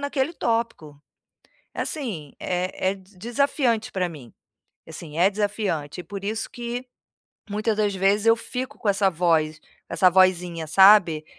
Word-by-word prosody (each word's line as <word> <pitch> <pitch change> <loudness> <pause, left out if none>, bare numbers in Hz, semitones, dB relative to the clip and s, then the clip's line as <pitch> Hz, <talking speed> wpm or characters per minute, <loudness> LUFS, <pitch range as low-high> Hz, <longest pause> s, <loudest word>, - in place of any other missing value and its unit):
naquele 285 +1 -1
tópico. 225 - -3 0.7
Assim, 200 - -4
é 185 +1 -1
é - - -5
desafiante 230 +5 -1
para 185 -2 -1
mim. 145 -9 -11 0.5
Assim, 160 -1 -9
é 190 +3 +5
desafiante 200 -7 -2
e - - -10
por 200 -1 -7
isso 220 +2 -3
que, 240 +1 -5 0.7
muita 215 +2 0
das 210 -1 0
vezes, 195 +3 +2
eu 225 0 +6
fico 255 +2 -5
com 215 - -3
essa 195 -1 +3
voz, 160 -2 +1
com - - -30 0.3
essa 185 - +5
vozinha, 180 -3 +2
sabe. 185 -3 +6
195 Hz, 140 wpm, -24 LUFS, 170-225 Hz, 0.7 s, eu